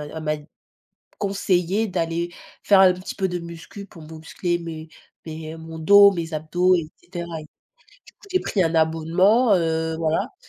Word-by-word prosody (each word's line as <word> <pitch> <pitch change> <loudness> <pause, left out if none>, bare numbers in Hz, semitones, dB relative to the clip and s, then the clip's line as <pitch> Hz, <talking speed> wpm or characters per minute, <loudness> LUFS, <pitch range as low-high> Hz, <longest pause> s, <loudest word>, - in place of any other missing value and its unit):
elle 160 - -6
m'a 155 0 -1
d 150 +1 -16 0.7
conseillé 195 +1 0
d'aller 170 -2 -2 0.3
faire 195 -2 +5
un 185 -1 +7
petit 185 +1 -8
peu 190 -1 -1
de 180 0 -3
muscu 170 +4 -10
pour 165 -5 -14
muscler 165 +2 -4
mes 160 -1 -8 0.4
mes 160 0 -7
mon 160 0 -9
dos, 200 +4 +7
mes 165 -2 -5
abdos, 175 +4 +2
et 155 -2 -3
cetera. 175 -1 -7 0.2
Du 155 - -20 0.5
coup, 405 - -20
j'ai 370 - +2
pris 195 - 0
un 165 0 0
abonnement, 170 +8 +3
heu, 160 -2 0
voilà. 160 -1 -1
170 Hz, 165 wpm, -23 LUFS, 160-190 Hz, 0.7 s, un